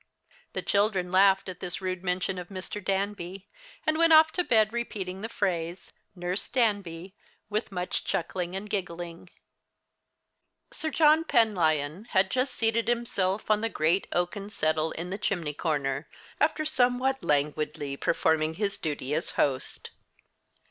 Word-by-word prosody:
The - - -2
children 200 -3 +1
laughed 195 +1 +5
at 185 -2 -6
this 180 -1 -3
rude 185 -1 -3
mention 185 0 -1
of 175 - -7
Mr. 195 +1 -6
Danby, 195 -1 -2 0.4
and 310 0 +1
went 330 -1 +6
off 315 0 +8
to 360 - 0
bed 220 -6 +3
repeating 195 -6 -4
the 225 - -4
phrase 175 -4 -2 0.2
"Nurse 180 +2 -2
Danby" 195 -7 0 0.4
with 215 +1 -1
much 180 -1 -2
chuckling 180 +1 -2
and 195 +2 -4
giggling. 175 -3 -4 1.4
Sir 315 - -3
John 310 +1 +5
Penlyon 180 - +2
had 190 -3 +2
just 255 +1 0
seated 225 0 +1
himself 215 -4 0
on 215 0 +3
the 225 - 0
great 170 0 +1
oaken 180 +3 -2
settle 155 -5 0
in 175 +2 -5
the 195 - -4
chimney 170 -8 -1
corner, 145 -2 -1 0.3
after 310 +1 +1
somewhat 260 -2 +2
languidly 145 -1 -1
performing 160 +1 +1
his 200 +1 -2
duty 145 -3 -3
as 160 +4 0
host. 130 -2 0
190 Hz, 140 wpm, -28 LUFS, 170-220 Hz, 1.4 s, off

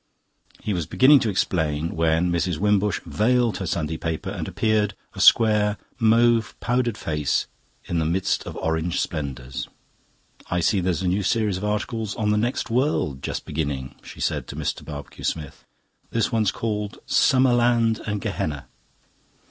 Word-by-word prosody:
He 105 - -1
was 85 -4 -2
beginning 135 +2 +6
to 115 - 0
explain, 80 -5 -1
when 80 +2 +2
Mrs. 85 -1 0
Wimbush 105 +1 +1
vailed 120 +1 +2
her 95 - -4
Sunday 80 -1 -2
paper, 80 +5 -3
and 90 -6 -4
appeared, 110 -2 +1 0.2
a - - -5
square, 105 -2 +5 0.2
mauve 115 0 +3
powdered 120 -2 0
face 75 -3 0 0.4
in 85 - -1
the 80 - 0
midst 90 +4 0
of - - -6
orange 80 +1 -1
splendours. 65 -4 -4 0.8
"I 90 - 0
see 95 +4 +2
there's 90 0 -1
a - - 0
new 95 +3 +1
series 105 -1 +1
of 95 - -7
articles 105 +1 -2
on 105 -2 0
the 105 - +2
next 120 +1 -1
world 115 - 0
just - - -4
beginning," 70 -4 -3
she - - -12
said - - -1
to - - -7
Mr. - - -3
Barbecue 75 -2 -9
Smith. 75 -4 -4 0.4
"This 115 0 0
one's 110 -4 +2
called 105 -2 -3
'Summer 130 -1 +4
Land 120 -2 +2
and 105 -1 -2
Gehenna. 75 -5 -3
100 Hz, 160 wpm, -24 LUFS, 80-115 Hz, 0.8 s, beginning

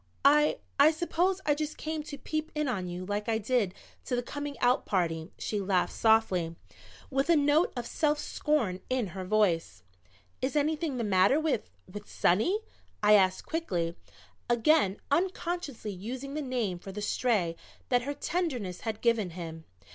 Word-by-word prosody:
"I 300 +2 +5 0.2
I 285 +2 +8
suppose 345 +4 0
I 295 - +4
just 305 +1 -3
came 315 0 -3
to 285 - -7
peep 310 +2 -3
in 300 -1 0
on 190 -8 -2
you 180 +1 -5
like 205 +2 -2
I 225 - +2
did 220 -3 0 0.3
to 250 - -1
the 245 - -1
coming 290 +2 -5
out 245 +2 +3
party." 165 -3 -1
She 210 -2 -2
laughed 190 -2 +1
softly, 190 -7 +2 0.6
with 270 +3 0
a 340 - +6
note 295 +3 +3
of 240 - -3
self 300 +2 +1
scorn 285 -12 0
in 255 -6 0
her 190 -1 -5
voice. 180 - +1 0.6
"Is 260 +3 -1
anything 300 -1 0
the 235 - -1
matter 200 +6 +4
with 310 -8 -1 0.2
with 205 +2 -9
Sonny?" 285 - +2 0.4
I 210 0 +7
asked 190 -2 +4
quickly, 175 - -2 0.5
again 240 -4 +3
unconsciously 340 - -1
using 250 +9 -6
the 305 - -2
name 240 -10 -2
for 195 - -8
the 205 +2 -5
Stray 205 -8 +1 0.3
that 245 -1 +3
her 285 +3 -4
tenderness 260 - -2
had 220 -1 -4
given 230 -5 +2
him. 165 -2 -8
240 Hz, 165 wpm, -29 LUFS, 190-300 Hz, 0.6 s, I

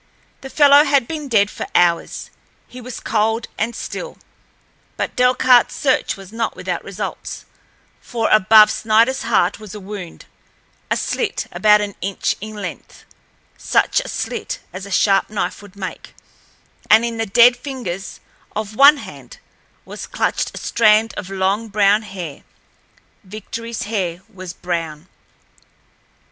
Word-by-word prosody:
The 270 - -8
fellow 285 0 +6
had 275 -4 +2
been 305 -3 -5
dead 205 -5 +2
for - - -6
hours—he 175 +7 -2
was 250 0 -7
cold 225 +1 0
and 225 +2 -2
still. - - -6 0.8
But - - -3
Delcarte's 250 0 +4
search 265 -6 0
was 195 +1 -13
not 230 0 -2
without - - -4
results, - - -6 0.6
for 230 -2 -2
above 215 +1 +7
Sniderl's 225 +4 +2
heart 225 -3 +1
was 215 -2 -10
a - - -7
wound, 195 -3 -9 0.6
a - - +1
slit 435 -4 -2
about 210 -1 +4
an 205 -1 -4
inch 195 +1 -1
in 215 +1 -7
length—such 205 - -3
a - - -6
slit - - -4
as 185 +1 -7
a - - -11
sharp 195 +1 +2
knife 210 0 -3
would 205 -1 -15
make, 195 -2 -8 0.7
and 220 +2 +6
in 230 -1 -4
the 225 0 -2
dead 240 +4 +6
fingers 245 -8 -6 0.3
of 215 0 -4
one 280 +4 +7
hand - - -11 0.5
was - - -8
clutched - - -1
a - - -6
strand 220 0 +3
of 195 -2 -6
long 195 +3 -1
brown 205 0 +3
hair—Victoryl's 205 +4 -9
hair 185 -5 -3
was 185 -2 -8
brown. 165 -2 -5
215 Hz, 135 wpm, -19 LUFS, 195-235 Hz, 0.8 s, above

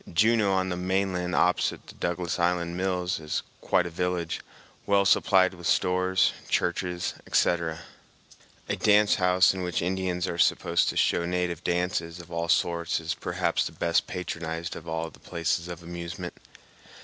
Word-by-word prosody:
Juneau, 105 +3 +3
on 95 0 +1
the 90 - -1
mainland 90 -1 -1
opposite 90 0 +1
the - - -12
Douglas 85 0 -2
Island 85 0 0
mills, 90 -1 -1
is 75 -1 -3 0.2
quite 90 - +2
a 85 - -5
village, 90 -1 -2 0.5
well 100 -1 +4
supplied 95 -1 +4
with 90 -1 -6
stores, 90 +1 +2 0.2
churches, 90 0 -1
etc. 80 -2 +1 0.9
A - - -1
dance 105 0 +4
house 90 +2 +5
in 95 - -5
which 90 -1 -1
Indians 90 0 -1
are 85 - -4
supposed - - +3
to - - -3
show 85 - +2
native 90 -2 -2
dances 90 -1 -1
of 85 0 -12
all 85 0 -2
sorts 85 -1 +1
is 80 +1 -2
perhaps - - -1
the - - -9
best 85 -1 +1
patronized 85 -2 -4
of 85 - -10
all 80 0 -3
the - - -18
places 85 0 -2
of 85 -1 -8
amusement. 85 +1 -6
90 Hz, 160 wpm, -27 LUFS, 85-90 Hz, 0.9 s, house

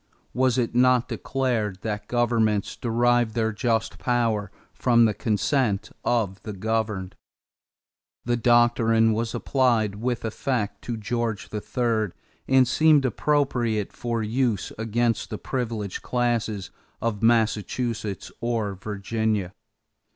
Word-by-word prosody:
Was 130 0 +2
it 120 -3 0
not 125 0 +4
declared 115 -8 -1
that 105 -1 -3
governments 115 -4 +1
derive 120 -1 +1
their 110 -1 0
just 115 +1 -1
power 115 -5 0 0.2
from 120 -1 +4
the 110 - +2
consent 105 -1 0
of 105 -5 0
the 105 - -6
governed? 105 -2 -2 1.1
That 120 0 +1
doctrine 115 -1 +4
was 115 +1 -2
applied 120 -6 +1
with 115 +3 -2
effect 110 -1 -2
to 120 -2 -3
George 110 -2 -2
III 110 -2 -1 0.3
and 130 -1 +5
seemed 155 0 +4
appropriate 125 -6 0
for 115 -2 -2
use 115 -2 0
against 115 +1 0
the 105 - -4
privileged 115 -7 -3
classes 115 -5 -1 0.3
of 115 -3 -2
Massachusetts 110 -2 0
or 115 -4 -1
Virginia. 105 0 -2
115 Hz, 115 wpm, -25 LUFS, 105-120 Hz, 1.1 s, and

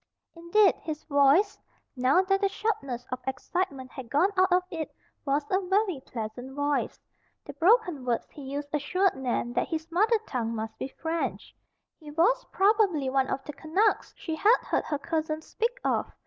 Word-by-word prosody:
Indeed 350 +4 +4
his 310 -1 -5
voice, 285 +8 +3 0.4
now 265 +8 +3
that 390 +1 +1
the 395 - +3
sharpness 275 - -3
of 255 - -2
excitement 265 0 -3
had 255 -4 -9
gone 350 - +3
out 375 0 +3
of 360 0 +4
it, 325 -3 -4 0.4
was 285 +1 +1
a 380 +1 +3
very 385 -6 +1
pleasant 245 +3 -6
voice. 285 0 -1 0.5
The - - -8
broken 360 - +3
words 240 -2 -1
he 295 - -11
used 285 +2 -5
assured 365 +6 +1
Nan 245 -2 -2
that - - 0
his 320 0 -4
mother 430 +7 +3
tongue 230 -2 -2
must 220 0 -4
be - - -3
French. 325 +4 -4 0.4
He 305 -3 -11
was 390 +12 +2
probably 385 -9 +3
one 265 0 +2
of 270 - -3
the 300 - -7
"Canucks" 330 +9 +1
she 325 - -4
had 435 +9 +5
heard - - -1
her 295 - -1
cousins 315 +1 -2
speak 475 +2 -2
of. - - 0
315 Hz, 175 wpm, -28 LUFS, 270-380 Hz, 0.5 s, had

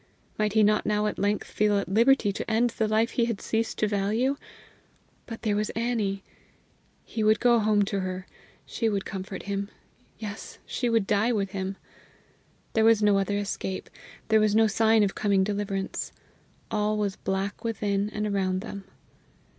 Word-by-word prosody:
Might 210 -1 +1
he 220 -1 +5
not 210 0 +3
now 210 0 +1
at 210 - -2
length 205 +1 0
feel 210 -1 +2
at 200 - -1
liberty 225 +1 +4
to - - -5
end 230 +2 +2
the 220 -1 0
life 220 +2 +2
he 235 - +1
had 230 -4 -2
ceased 225 0 -2
to 215 - +1
value? 215 +7 +1 0.9
But 225 -1 -8
there 210 -3 +1
was 210 +1 0
Annie! 220 -4 -1 0.8
He 220 - -3
would 215 +1 +4
go 240 -1 +4
home 210 -1 +3
to 200 0 -2
her; 185 -1 -4 0.4
she 225 - -1
would 200 -2 -2
comfort 190 -1 -6
him 200 0 -3 0.5
yes, 210 -2 -7
she 245 - -1
would 225 -3 +2
die 210 +4 +2
with 200 -4 -1
him! 190 0 -4 1.0
There 220 - +3
was 225 -1 +5
no 205 -1 +4
other 200 +1 0
escape; 195 -2 -4 0.4
there 220 0 +5
was 215 -1 +2
no 225 0 +6
sign 220 0 +4
of 195 - 0
coming 200 -2 +2
deliverance. 200 -1 -3 0.6
All 210 0 +1
was 200 -2 -1
black 195 +3 -3
within 205 -3 -1
and 210 0 -3
around 190 -2 0
them. 200 -2 -7
210 Hz, 175 wpm, -27 LUFS, 200-220 Hz, 1.0 s, no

